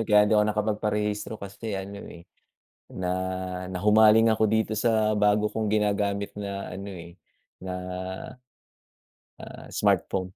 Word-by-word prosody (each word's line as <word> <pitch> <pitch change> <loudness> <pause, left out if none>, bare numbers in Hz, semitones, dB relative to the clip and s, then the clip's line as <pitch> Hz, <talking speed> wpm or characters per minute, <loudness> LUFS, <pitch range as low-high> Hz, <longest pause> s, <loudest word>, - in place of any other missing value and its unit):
eh, 115 - -2
kaya 105 0 +6
hindi 105 - +2
ako 105 - +5
nakapagparehistro 105 0 -1
kasi 100 +1 -6
ano, 100 +1 -6
eh, 85 - -12 0.7
na, 90 -1 -3 0.6
nahumaling 110 +4 +5
ako 110 0 +1
dito 110 0 +1
sa 110 -1 +2
bago 105 +1 +3
kong 110 -2 -1
ginagamit 100 -1 0
na 100 -2 -5
ano, 100 +2 -7
eh, 85 -2 -10 0.5
na, 95 0 -5 1.7
ah - - -10
smartphone. 95 -1 +1
105 Hz, 125 wpm, -26 LUFS, 100-110 Hz, 1.7 s, kaya